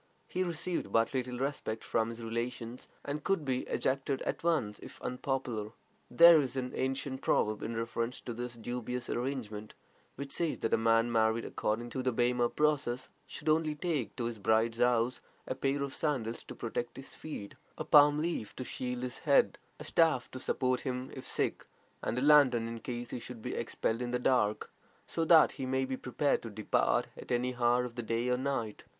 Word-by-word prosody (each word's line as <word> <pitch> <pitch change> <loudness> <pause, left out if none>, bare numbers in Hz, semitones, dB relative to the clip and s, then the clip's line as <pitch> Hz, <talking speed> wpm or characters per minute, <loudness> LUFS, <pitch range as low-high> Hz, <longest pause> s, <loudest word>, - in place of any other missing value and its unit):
He 185 - -2
received 175 0 -3
but 115 +2 +2
little 125 -1 -2
respect 130 -4 -3
from 115 0 0
his 115 0 -7
relations, 115 +1 -4 0.2
and 145 +1 -3
could 195 -6 0
be 130 -1 -1
ejected 135 0 -1
at - - -3
once 115 -12 +1
if - - -11
unpopular. 125 -4 -2 0.4
There 170 +5 +8
is 135 -1 -3
an 125 -1 -2
ancient 130 0 -2
proverb 105 0 +1
in 115 0 -3
reference 115 +1 -2
to 120 - -5
this 120 +1 -5
dubious 120 +1 -4
arrangement, 120 -5 -4 0.4
which 140 0 -6
says 170 -3 0
that 115 - 0
a - - +8
man 115 +1 +3
married 110 0 +2
according 120 +3 -2
to 130 - -2
the 130 0 +1
Bema 120 0 +2
process 140 -5 0 0.2
should 150 - -9
only 155 0 +2
take 150 -6 -2
to 125 - -3
his 115 -2 -4
bride's 110 +3 +2
house 120 0 +2 0.2
a - - -2
pair 140 +2 0
of 140 -1 -4
sandals 125 -7 -2
to - - -9
protect 120 +1 -4
his 135 - -9
feet, 125 -10 -7 0.2
a - - -4
palm 145 0 +7
leaf 155 -9 -2
to - - -4
shield 125 0 -4
his 125 0 -4
head, - - +3 0.2
a - - -6
staff 160 -7 +2
to 130 - -6
support 130 0 0
him 130 0 -4
if 130 - -8
sick, - - -1 0.3
and 115 - -2
a 125 - 0
lantern 135 -6 +6
in 115 0 -5
case 120 0 -5
he - - -3
should 120 -1 -9
be - - -3
expelled 115 +2 -1
in 120 - -2
the 125 - +1
dark, 125 -4 +1 0.3
so 165 - -1
that 160 -1 +7
he 130 - -4
may 130 0 +1
be 130 0 -2
prepared 130 +3 0
to 115 - -7
depart 110 0 +1
at - - -9
any 125 +1 +1
hour 120 +1 +3
of 120 - -7
the 120 - -4
day 115 +2 -1
or 125 - +2
night. 130 -5 -2
125 Hz, 195 wpm, -32 LUFS, 115-135 Hz, 0.4 s, There